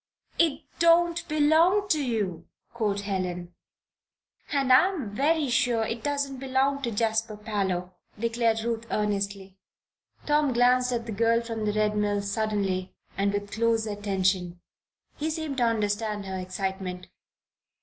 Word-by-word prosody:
"It 320 Hz, -3 st, +2 dB, 0.2 s
don't 340 Hz, 0 st, +4 dB
belong 320 Hz, +7 st, +3 dB
to 305 Hz, -5 st, +2 dB
you," 200 Hz, -9 st, -2 dB, 0.3 s
quoth 210 Hz, -4 st, -1 dB
Helen. 180 Hz, -3 st, -3 dB, 1.0 s
"And 270 Hz, -3 st, +3 dB
I'm 300 Hz, -, +3 dB
very 300 Hz, +3 st, +2 dB
sure 240 Hz, -2 st, +2 dB
it 230 Hz, +1 st, -3 dB
doesn't 280 Hz, -2 st, -2 dB
belong 270 Hz, +1 st, +1 dB
to 240 Hz, -, -1 dB
Jasper 220 Hz, 0 st, -1 dB
Parloe," 190 Hz, -4 st, -2 dB, 0.2 s
declared 230 Hz, 0 st, +1 dB
Ruth, 230 Hz, 0 st, -3 dB
earnestly. 200 Hz, -2 st, -2 dB, 0.7 s
Tom 295 Hz, -2 st, +2 dB
glanced 250 Hz, +1 st, +3 dB
at 235 Hz, -2 st, -2 dB
the 230 Hz, -, -5 dB
girl 230 Hz, +2 st, +2 dB
from 225 Hz, -2 st, -4 dB
the 210 Hz, -, 0 dB
Red 210 Hz, 0 st, +1 dB
Mill 205 Hz, -1 st, 0 dB
suddenly, 200 Hz, -3 st, -1 dB, 0.2 s
and 200 Hz, +1 st, +1 dB
with 205 Hz, 0 st, -3 dB
close 225 Hz, 0 st, +1 dB
attention. 190 Hz, -4 st, -1 dB, 0.6 s
He 310 Hz, +2 st, -2 dB
seemed 315 Hz, -3 st, -3 dB
to 245 Hz, -, +3 dB
understand 210 Hz, -2 st, -1 dB
her 190 Hz, -1 st, -4 dB
excitement. 185 Hz, 0 st, -4 dB
225 Hz, 135 wpm, -27 LUFS, 200-265 Hz, 1.0 s, don't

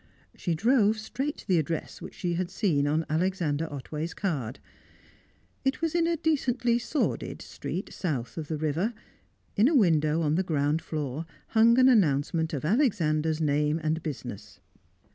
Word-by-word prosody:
She 170 Hz, -3 st, -1 dB
drove 220 Hz, +3 st, +3 dB
straight 270 Hz, +7 st, -3 dB
to -, -, -13 dB
the 180 Hz, -4 st, +4 dB
address 160 Hz, +1 st, -3 dB
which -, -, -9 dB
she 175 Hz, -2 st, -2 dB
had 175 Hz, +1 st, -1 dB
seen 170 Hz, -8 st, +1 dB
on 155 Hz, +2 st, +1 dB
Alexander 160 Hz, -2 st, 0 dB
Otway's 150 Hz, +4 st, -5 dB
card. 140 Hz, -, -2 dB, 1.1 s
It 270 Hz, +1 st, 0 dB
was 330 Hz, -1 st, -1 dB
in 340 Hz, -1 st, +2 dB
a 335 Hz, -1 st, +1 dB
decently 250 Hz, -7 st, +1 dB
sordid 260 Hz, +5 st, -2 dB
street -, -, -6 dB
south 140 Hz, -10 st, -3 dB
of 160 Hz, -3 st, -5 dB
the 155 Hz, -, -2 dB
river; 160 Hz, +9 st, -1 dB, 0.6 s
in 215 Hz, +4 st, +5 dB
a 315 Hz, -, +2 dB
window 165 Hz, -, +3 dB
on 150 Hz, -1 st, +1 dB
the 175 Hz, -, +2 dB
ground 150 Hz, -2 st, 0 dB
floor 155 Hz, 0 st, -4 dB, 0.2 s
hung 230 Hz, +1 st, +5 dB
an 255 Hz, 0 st, +7 dB
announcement 160 Hz, -, +3 dB
of 145 Hz, -1 st, -3 dB
Alexander's 160 Hz, -, +2 dB
name 150 Hz, 0 st, +1 dB
and 155 Hz, +1 st, 0 dB
business. 120 Hz, -, -7 dB
165 Hz, 160 wpm, -28 LUFS, 150-220 Hz, 1.1 s, an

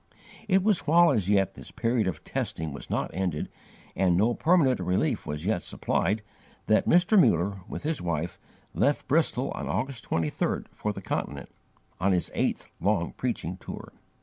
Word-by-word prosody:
It 190 Hz, -2 st, +3 dB
was 205 Hz, -7 st, +2 dB
while 170 Hz, +2 st, +6 dB
as 105 Hz, -8 st, 0 dB
yet 95 Hz, -2 st, +3 dB
this -, -, -11 dB
period 115 Hz, -3 st, 0 dB
of 80 Hz, -5 st, -3 dB
testing 80 Hz, -2 st, -3 dB
was 70 Hz, -, -8 dB
not -, -, -1 dB
ended, 90 Hz, -4 st, -2 dB, 0.5 s
and 90 Hz, -2 st, +3 dB
no 110 Hz, +5 st, +3 dB
permanent 155 Hz, -, +3 dB
relief 95 Hz, -, 0 dB
was 75 Hz, +3 st, -4 dB
yet 100 Hz, -4 st, +1 dB
supplied, 105 Hz, +4 st, -1 dB, 0.4 s
that 110 Hz, -, +3 dB
Mr. 180 Hz, +3 st, +6 dB
Muller, 95 Hz, -, +2 dB
with -, -, -6 dB
his 155 Hz, +1 st, -1 dB
wife, 85 Hz, -1 st, -2 dB, 0.3 s
left -, -, +1 dB
Bristol -, -, +1 dB
on -, -, -5 dB
August 130 Hz, -4 st, -2 dB
23rd, 80 Hz, -2 st, -1 dB
for 105 Hz, -, -3 dB
the 100 Hz, -1 st, -8 dB
Continent, -, -, -3 dB, 0.5 s
on 95 Hz, +2 st, +2 dB
his 90 Hz, -, 0 dB
eighth -, -, -1 dB
long 100 Hz, -5 st, +1 dB
preaching 105 Hz, -8 st, -3 dB
tour. -, -, -9 dB
100 Hz, 165 wpm, -27 LUFS, 90-130 Hz, 0.5 s, while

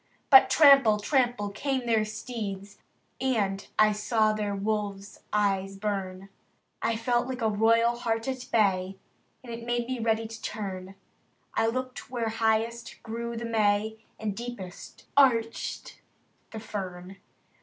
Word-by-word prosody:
But 265 Hz, -, +9 dB
trample! 275 Hz, -8 st, +7 dB
trample! 240 Hz, -3 st, +1 dB
came 260 Hz, +4 st, -2 dB
their 225 Hz, -2 st, +2 dB
steeds, 210 Hz, -3 st, -6 dB, 0.4 s
And 205 Hz, -7 st, 0 dB
I 215 Hz, 0 st, +6 dB
saw 215 Hz, +1 st, +1 dB
their 210 Hz, -1 st, -2 dB
wolf's 200 Hz, -1 st, -3 dB
eyes 195 Hz, -2 st, 0 dB
burn, 195 Hz, -2 st, -4 dB, 0.5 s
I 230 Hz, -, 0 dB
felt 240 Hz, +2 st, 0 dB
like 260 Hz, -2 st, -4 dB
a 220 Hz, -, +3 dB
royal 230 Hz, +3 st, +3 dB
hart 225 Hz, -1 st, -2 dB
at 255 Hz, -1 st, -4 dB
bay. 195 Hz, -3 st, +2 dB, 0.5 s
And 235 Hz, -1 st, -7 dB
made 240 Hz, 0 st, -1 dB
me 255 Hz, 0 st, -3 dB
ready 225 Hz, 0 st, +1 dB
to 225 Hz, 0 st, -10 dB
turn. 195 Hz, -3 st, -5 dB, 0.6 s
I 225 Hz, -, +2 dB
looked 255 Hz, +2 st, -4 dB
where 235 Hz, -3 st, -2 dB
highest 225 Hz, +1 st, -1 dB
grew 235 Hz, +1 st, -5 dB
the 235 Hz, -, -4 dB
May, 220 Hz, -1 st, +1 dB, 0.2 s
And 210 Hz, -2 st, -3 dB
deepest 235 Hz, -6 st, -8 dB
arched 230 Hz, -5 st, +1 dB, 0.5 s
the 220 Hz, -, -7 dB
fern. 190 Hz, -3 st, -7 dB
220 Hz, 135 wpm, -28 LUFS, 205-235 Hz, 0.6 s, But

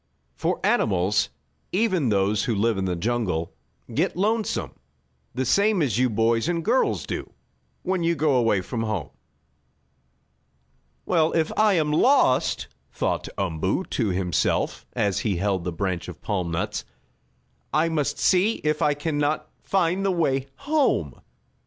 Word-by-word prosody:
For -, -, -1 dB
animals, 100 Hz, +1 st, +2 dB, 0.4 s
even 185 Hz, -, +1 dB
those 100 Hz, 0 st, +1 dB
who 115 Hz, -, 0 dB
live 110 Hz, 0 st, +1 dB
in 95 Hz, -, -1 dB
the 90 Hz, -1 st, -1 dB
jungle, 90 Hz, -4 st, -1 dB, 0.4 s
get -, -, 0 dB
lonesome, 215 Hz, +3 st, 0 dB, 0.6 s
the 130 Hz, +1 st, -1 dB
same 200 Hz, -, +3 dB
as 120 Hz, -5 st, 0 dB
you 130 Hz, 0 st, +3 dB
boys 115 Hz, +5 st, +1 dB
and 170 Hz, -2 st, -1 dB
girls 245 Hz, +4 st, +1 dB
do -, -, -5 dB, 0.5 s
when 185 Hz, -1 st, 0 dB
you 170 Hz, 0 st, +1 dB
go 150 Hz, -1 st, +2 dB
away 115 Hz, -6 st, +2 dB
from 115 Hz, +5 st, -4 dB
home. 110 Hz, -2 st, -3 dB, 1.9 s
"Well, 165 Hz, -3 st, +2 dB
if 160 Hz, -2 st, +1 dB
I 215 Hz, -1 st, +4 dB
am 155 Hz, -4 st, +1 dB
lost," 150 Hz, -, +3 dB, 0.2 s
thought -, -, -2 dB
Umboo 95 Hz, -, -1 dB
to 115 Hz, -, 0 dB
himself, 90 Hz, -2 st, 0 dB
as 100 Hz, -2 st, 0 dB
he 105 Hz, -4 st, 0 dB
held 95 Hz, -1 st, -1 dB
the 90 Hz, -, -1 dB
branch 90 Hz, 0 st, -3 dB
of -, -, -9 dB
palm 90 Hz, -4 st, -2 dB
nuts, 85 Hz, 0 st, -2 dB, 0.9 s
"I 155 Hz, +2 st, +2 dB
must 150 Hz, -3 st, -1 dB
see 190 Hz, +4 st, +3 dB
if 150 Hz, 0 st, 0 dB
I 145 Hz, -1 st, +3 dB
can 145 Hz, 0 st, -2 dB
not 150 Hz, +1 st, -1 dB
find 190 Hz, 0 st, +1 dB
the 195 Hz, -, +2 dB
way 140 Hz, -7 st, 0 dB, 0.2 s
home." 300 Hz, -1 st, +1 dB
130 Hz, 145 wpm, -24 LUFS, -, 1.9 s, I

